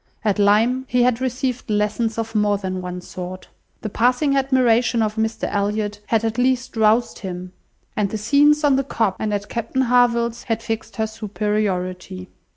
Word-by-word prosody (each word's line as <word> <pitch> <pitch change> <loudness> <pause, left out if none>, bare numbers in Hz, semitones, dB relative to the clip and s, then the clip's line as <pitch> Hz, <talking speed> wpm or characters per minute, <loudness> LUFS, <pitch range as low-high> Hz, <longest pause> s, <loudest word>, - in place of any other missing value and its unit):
At 210 -1 +1
Lyme, 225 +6 +3
he 245 -1 +3
had 245 0 +2
received 255 -1 -2
lessons 215 +2 0
of 225 0 -3
more 210 -1 +2
than 185 -2 -4
one 180 0 -6
sort. 180 +1 -8 0.3
The 215 - -4
passing 250 +6 +2
admiration 250 -3 +2
of 215 -1 -1
Mr 220 0 -2
Elliot 205 0 -1
had 225 -1 +1
at 225 +2 -2
least 255 0 0
roused 225 +2 +2
him, 180 -2 -7 0.4
and 205 -2 0
the 220 - -3
scenes 290 +7 +3
on 280 -2 +4
the 270 - +1
Cobb 225 -7 0
and 215 - -1
at 205 0 -2
Captain 235 +3 -2
Harville's 235 -1 +2
had 225 -2 -2
fixed 225 0 -4
her 220 - 0
superiority. 200 -4 -3
220 Hz, 170 wpm, -21 LUFS, 205-245 Hz, 0.4 s, on